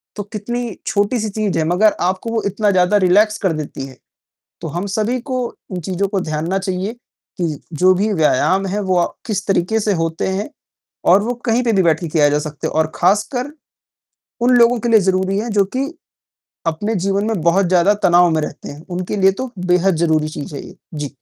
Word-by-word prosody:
तो 205 - -4
कितनी 220 +2 -5
छोटी-सी 215 +2 0
चीज़ 205 -3 -2
है - - +2
मगर 205 +5 +3 0.2
आपको 190 +5 -4
वो 225 - 0
इतना 205 +1 +1
ज़्यादा 185 +2 +3
रिलैक्स 210 +4 +4
कर 180 - +2
देती 150 -3 -5
है। 130 - -14 0.6
तो 165 - -5
हम 180 +3 -2
सभी 225 +4 0
को 255 +1 -3 0.3
इन 180 - -3
चीज़ों 190 +3 -2
को 195 -1 -1
ध्यान 155 -2 -3
ना 190 +2 +1
चाहिए 190 +2 -3 0.5
कि 155 -4 -1 0.2
जो 185 0 +7
भी 205 +3 0
व्यायाम 185 +4 +2
है 200 +2 -2
वो 190 -2 0
अ, 175 - +3 0.2
किस 210 -3 -2
तरीके 195 +3 +1
से 210 0 +1
होते 165 +2 -2
हैं 195 +3 -2 0.6
और 200 - +5
वो 245 +3 -2
कहीं 230 +2 +2
पे 230 - +2
भी 195 -3 +3
बैठ 165 -3 +2
के 170 - -4
किया 150 -2 +3
जा 145 - +2
सकते 150 -1 -5
हैं - - -4
और 155 0 +1
खासकर 245 - 0 0.9
उन 250 +1 +4
लोगों 235 0 +5
के 240 - -2
लिए 225 -1 +6
ज़रूरी 190 +1 +1
है 230 +3 -3
जो 195 - +4
कि 265 - +1 0.8
अपने 205 +8 -1
जीवन 200 +1 0
में 220 -5 -1
बहुत 170 +4 +3
ज़्यादा 185 +3 +4
तनाव 175 0 +5
में 160 - +1
रहते 150 - -6
हैं। 145 +3 -11
उनके 185 +3 -3
लिए 195 0 +5
तो 260 -2 -5
बेहद 180 +1 +3
ज़रूरी 160 -2 +1
चीज़ 150 -1 -7
है - - -7
ये। 180 - -13 0.2
जी। 145 -1 -3
190 Hz, 210 wpm, -18 LUFS, 170-215 Hz, 0.9 s, जो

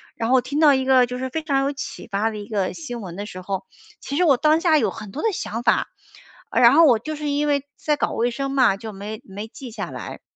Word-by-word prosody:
然 225 - -2
后 260 - +5
听 280 +4 -3
到 300 -3 +7
一 265 -1 +1
个 260 -1 +5
就 250 +1 -6
是 260 0 -3
非 315 +4 -3
常 275 -3 +1
有 280 +1 -1
启 280 - -7
发 210 +1 0
的 215 - -7
一 205 - -7
个 200 -4 -1
新 245 -8 -7
闻 180 -4 -8
的 205 +2 -5
时 185 -3 -8
候， 190 +1 -4 0.3
其 280 - -5
实 360 - +3
我 295 -6 +5
当 310 +3 +3
下 330 -3 +4
有 - - +1
很 215 -3 -9
多 285 - -5
的 450 - +2
想 230 - -4
法。 - - +2 0.6
然 235 -1 +6
后 330 +3 +7
我 250 -6 +5
就 310 +7 -5
是 300 0 -3
因 290 +1 0
为 285 -1 +1
在 300 -1 0
搞 - - 0
卫 240 +1 0
生 275 +3 -3
嘛， 255 -8 +3
就 220 0 -8
没 210 +3 -7
没 205 +2 -7
记 255 +2 -9
下 225 - -5
来。 - - -8
255 Hz, 290 characters per minute, -22 LUFS, 215-290 Hz, 0.6 s, 到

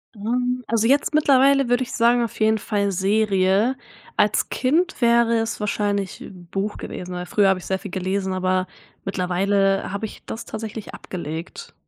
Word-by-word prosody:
Ähm, 245 +4 -1
also, 225 0 +2
jetzt 285 +3 +2
mittlerweile 275 -3 +4
würde 245 +1 +2
ich 250 - -8
sagen 240 0 +3
auf 230 - -5
jeden 220 0 +3
Fall 200 -1 -1
Serie. 195 +3 +2 0.4
Als - - +2
Kind 320 +5 0
wäre 235 0 +4
es 225 0 -2
wahrscheinlich 205 -2 -2 0.3
Buch 200 +2 -2
gewesen, 180 0 -7
weil 180 0 -4
früher 200 +1 +3
habe 190 -1 +2
ich - - -11
sehr 190 0 -1
viel 200 - -8
gelesen, 190 0 -2
aber 185 0 0 0.4
mittlerweile 195 +1 +1
habe 200 +2 -2
ich 215 - -11
das 225 - -6
tatsächlich 220 -1 -7
abgelegt. 170 - -7
210 Hz, 160 wpm, -22 LUFS, 190-235 Hz, 0.4 s, mittlerweile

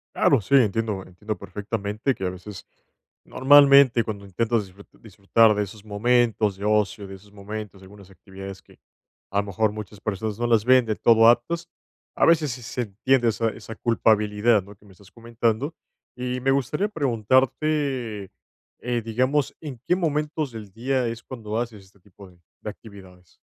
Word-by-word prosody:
Claro, - - +3
sí, 140 +9 +1
entiendo 110 -4 +1
entiendo 105 +4 -6
perfectamente 105 +4 -3
que 95 - -5
a - - 0
veces, 95 +2 -10 0.6
normalmente 140 -2 +6
cuando 100 -2 -6
intentas 110 +3 -1
disfrut 95 +2 -17
disfrutar 110 +1 +3
de 105 - 0
esos 105 +2 -11
momentos 110 -1 +1
de 100 - -6
ocio, 105 -2 0
de 95 - -9
esos 100 +2 -18
momentos, 105 -1 -8
de - - -14
algunas 100 0 -15
actividades 95 +1 -11
que - - -22 0.5
a 100 - -2
lo - - 0
mejor 105 +2 0
muchas 105 -1 -9
personas 110 0 -4
no 120 - 0
las 115 -2 +2
ven 130 -1 +5
de 110 -1 -1
todo 115 -1 +5
aptas, 165 +9 +2 0.5
a - - +3
veces 155 -4 +3
sí 125 +1 -7
se 125 +1 -4
entiende 120 +4 +1
esa 115 +1 0
esa 115 - -9
culpabilidad, 105 -2 +2
¿no?, 100 +1 -14
que 105 - -25
me 100 - -17
estás 95 +1 -20
comentando, 115 +5 -2 0.4
y 125 0 -3
me 135 - 0
gustaría 140 - 0
preguntarte, 130 - 0 0.5
eh, 120 -1 -2
digamos, 130 +6 0
¿en 140 -6 -8
qué 180 - +3
momentos 150 -3 -2
del 110 -3 -10
día 125 +4 -1
es 115 0 -5
cuando 110 -4 -6
haces 115 -4 -5
este 95 +1 -25
tipo 100 0 -16
de 90 -1 -23 0.2
de - - -5
actividades? 95 -5 -16
110 Hz, 175 wpm, -24 LUFS, 100-125 Hz, 0.6 s, normalmente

